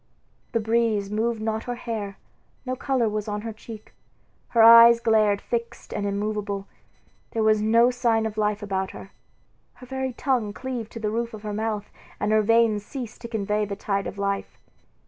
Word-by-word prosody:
The 230 - +2
breeze 220 -2 +1
moved 220 +1 -1
not 220 0 -2
her 245 - -3
hair, 215 -5 -5 0.5
no 255 0 -2
color 255 -3 0
was 210 0 -3
on 210 0 -3
her 225 0 -5
cheek, 215 0 -11 0.5
her 230 -2 +4
eyes 230 +1 +9
glared 215 -3 +3
fixed 235 +1 -5
and 205 -1 -2
immovable, 200 -1 -2 0.7
there 225 - 0
was 215 -1 +3
no 230 +3 +4
sign 235 -3 +1
of 220 -1 -3
life 210 -1 0
about 190 -2 -2
her. 195 - -11 0.6
Her 250 - -13
very 265 0 -3
tongue 240 -5 -1
cleaved 245 -2 -5
to 230 - -6
the 210 -1 -2
roof 230 0 -2
of 210 - -12
her 210 -1 -4
mouth, 215 -1 -3 0.3
and 210 - 0
her 215 0 +4
veins 225 -1 +3
ceased 245 0 -7
to 235 - -6
convey 210 -2 -1
the 200 -1 -3
tide 200 0 -2
of - - -7
life. 200 0 -2
220 Hz, 185 wpm, -25 LUFS, 210-235 Hz, 0.7 s, eyes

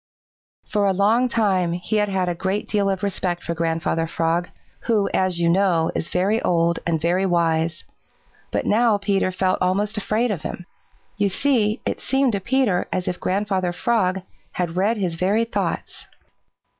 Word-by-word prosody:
For 205 -2 +1
a 195 - +2
long 220 +6 +3
time 190 -7 +1
he 180 +5 -2
had 210 -1 +1
had 190 -2 0
a 175 - 0
great 190 +4 -2
deal 200 -2 +1
of 190 -1 -2
respect 185 -3 -1
for 170 - -2
Grandfather 165 0 -1
Frog, 165 +2 -1 0.4
who, 215 -4 +2
as 185 -2 +1
you 170 - +2
know, 175 -2 +2
is - - -3
very 200 +5 +1
old 170 -1 +1
and 165 -2 +1
very 175 +4 +1
wise, 165 -2 0 0.7
but - - -2
now 225 0 +3
Peter 200 -2 0
felt 185 0 0
almost 200 +4 0
afraid 215 +4 0
of 180 -7 -3
him. 180 - -6 0.5
You 205 -1 +2
see, 225 -1 +1
it - - -2
seemed 270 -1 +1
to 200 - -1
Peter 240 -4 +1
as 180 - -2
if 180 - -2
Grandfather 190 -2 0
Frog 185 0 0 0.3
had 175 -2 -2
read 205 +5 +1
his 185 -4 -1
very 195 +7 +1
thoughts. 230 - -4
190 Hz, 170 wpm, -22 LUFS, 175-210 Hz, 0.7 s, long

